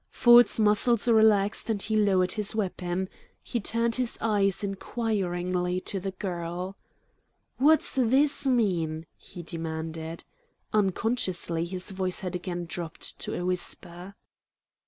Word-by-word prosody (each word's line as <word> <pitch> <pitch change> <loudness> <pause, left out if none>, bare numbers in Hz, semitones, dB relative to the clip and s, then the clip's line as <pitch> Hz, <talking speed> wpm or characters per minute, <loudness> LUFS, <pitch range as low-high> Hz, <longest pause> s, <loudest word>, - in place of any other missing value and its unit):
Ford's 240 -2 +6
muscles 215 +2 +3
relaxed, 220 -2 +3
and 215 -2 0
he 215 +2 -1
lowered 190 -4 +3
his 210 -1 -1
weapon. 185 -3 -2 0.4
He 240 - -3
turned 230 +2 0
his 250 -2 -1
eyes 200 -3 +1
inquiringly 185 -4 -2
to 195 - -2
the 195 +1 -4
girl. 180 -1 -5 0.8
"What's 310 +4 +4
THIS 270 +3 +3
mean?" 170 -10 0
he 175 - -11
demanded. 160 0 -5 0.5
Unconsciously 190 -5 0
his 185 +2 -4
voice 185 -1 -2
had 180 -2 -4
again 175 -1 -4
dropped 165 -1 -6
to - - -4
a 175 - -3
whisper. 180 +1 -4
195 Hz, 120 wpm, -27 LUFS, 175-220 Hz, 0.8 s, Ford's